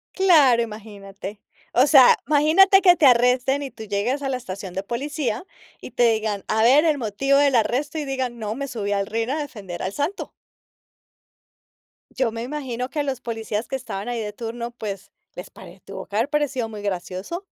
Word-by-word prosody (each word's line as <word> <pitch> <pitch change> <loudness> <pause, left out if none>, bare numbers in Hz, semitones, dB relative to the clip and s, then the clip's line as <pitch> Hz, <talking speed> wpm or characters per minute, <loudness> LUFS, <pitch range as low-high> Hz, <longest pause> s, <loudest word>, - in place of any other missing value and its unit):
Claro, 305 -11 +5
imagínate. 205 -2 -9 0.3
O 255 +4 +4
sea, 270 -4 +7
imagínate 320 +8 +5
que 355 -2 +6
te 310 - +2
arresten 250 +2 +3
y 275 - -5
tú 220 - -11
llegues 220 +7 -2
a 270 - -2
la 255 - -1
estación 190 -5 -8
de 190 - -3
policía, 250 - -3 0.4
y - - -9
te 240 -1 +3
digan: 215 -2 -3
"A 220 +1 +1
ver 280 +7 +5
el 305 -2 +2
motivo 265 +4 +1
del 280 -2 +3
arresto", 255 +7 0
y 300 - -3
digan: 260 -3 -3
"No, 215 0 -4
me 280 +1 -5
subí 205 -4 -3
al 200 0 -1
ring 230 +2 -2
a 295 - -1
defender 210 - -7
al 185 - -2
Santo". 290 - -4 1.8
Yo 255 -4 -1
me 230 +1 -5
imagino 255 -3 -4
que 300 - -4
a - - +1
los 270 -3 -3
policías 225 -1 -4
que - - -3
estaban 225 -5 -6
ahí 240 - -3
de 210 -1 -4
turno, 235 +2 -6
pues, 205 -5 -7 0.2
les - - -8
pare - - -14
tuvo - - -8
que 205 - -10
haber 235 +6 +1
parecido 280 -6 -1
muy 210 -2 -8
gracioso. 195 - -5
240 Hz, 195 wpm, -22 LUFS, 215-280 Hz, 1.8 s, sea